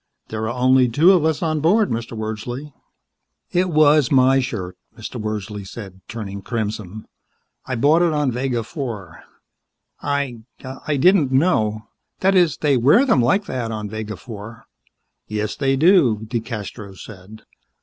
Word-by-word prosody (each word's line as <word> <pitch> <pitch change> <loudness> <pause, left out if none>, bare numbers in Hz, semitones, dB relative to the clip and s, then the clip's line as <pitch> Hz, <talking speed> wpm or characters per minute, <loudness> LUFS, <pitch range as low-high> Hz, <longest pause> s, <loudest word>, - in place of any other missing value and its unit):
There 110 0 -3
are 120 +1 -5
only 130 0 +4
the 115 - -7
two 165 +8 +6
of 175 -5 +3
us 160 +1 0
aboard, 165 +7 +2
Mr. 115 0 -4
Wordsley." 120 +6 -5 0.8
"It 180 +1 +1
was 150 -3 +4
my 135 0 +5
shirt," 100 -8 -4 0.2
Mr. - - -7
Wordsley 105 -1 -4
said, 95 -1 -10
turning 100 -4 -6
crimson. 110 -2 -4 0.6
"I 130 - -2
bought 145 +8 +3
it 175 -2 +3
on 150 -3 0
Vega 125 -1 -2
Four. 105 - -7 0.8
I 140 -4 -2 0.5
I 150 -2 +1
didn't 165 -2 +4
know 110 -8 +1 0.4
that 195 +1 +3
is, 175 -8 +3
they 145 -3 +2
wear 145 - +5
them 185 - +3
like 160 - +2
that 125 -3 -3
on 105 -1 -5
Vega 110 -2 -5
Four." 110 +1 -10 0.6
"Yes, 105 0 -3
they 135 -1 +1
do," 135 - +4
DeCastros 110 -3 -6
said. 105 +1 -13
120 Hz, 150 wpm, -21 LUFS, 110-150 Hz, 0.8 s, two